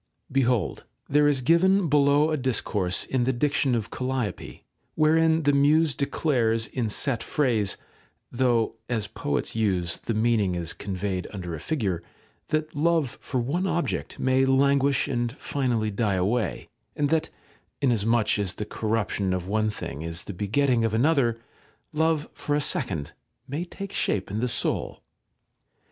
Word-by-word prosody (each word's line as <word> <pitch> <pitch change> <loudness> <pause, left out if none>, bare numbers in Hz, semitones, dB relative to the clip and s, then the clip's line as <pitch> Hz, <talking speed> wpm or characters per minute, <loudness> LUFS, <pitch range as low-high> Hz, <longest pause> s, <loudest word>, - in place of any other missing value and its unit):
§ - - -52 0.3
2. - - -15
Behold, 125 -6 +1 0.2
there 145 +1 +4
is 140 -3 +2
given 180 +6 +4
below 145 +1 +4
a - - +2
discourse 105 -8 0
in 130 -2 0
the 130 - +2
diction 135 0 +1
of 115 -2 -3
Calliope, 125 -4 -4 0.3
wherein 160 +1 +3
the 145 0 +3
Muse 150 +2 +4
declares 120 -6 0
in 115 -1 -3
set 120 +2 0
phrase 115 -8 0 0.5
(though, 120 -3 +1
as 115 -4 0
poets 75 -6 -3
use, 95 -6 +1
the 115 - -3
meaning 110 -4 +2
is 85 -1 -2
conveyed 95 -2 -3
under 90 -4 -6
a 80 - -5
figure) 100 - -2 0.5
that 155 -1 -2
love 160 -3 +1
for 130 - -3
one 160 +11 -1
object 170 -2 -2
may 130 0 +2
languish 140 +1 +3
and 120 -3 -1
finally 120 -6 -1
die 100 -1 0
away, 105 +6 -1 0.3
and 145 -1 0
that 160 0 +1 0.5
(inasmuch 115 -4 +2
as 95 -2 0
the 105 - -4
corruption 105 -3 -1
of 90 0 -4
one 110 +2 +1
thing 80 -8 -6
is 85 +1 -3
the 100 - -7
begetting 115 +6 +1
of 110 -1 0
another) 120 -3 +2 0.5
love 160 -1 +1
for 145 - -2
a - - +2
second 120 - -1 0.4
may 145 +6 -3
take 195 +2 -8
shape 95 -1 -1
in 105 - -2
the 125 - 0
soul. 120 - -2
125 Hz, 155 wpm, -26 LUFS, 105-145 Hz, 0.5 s, there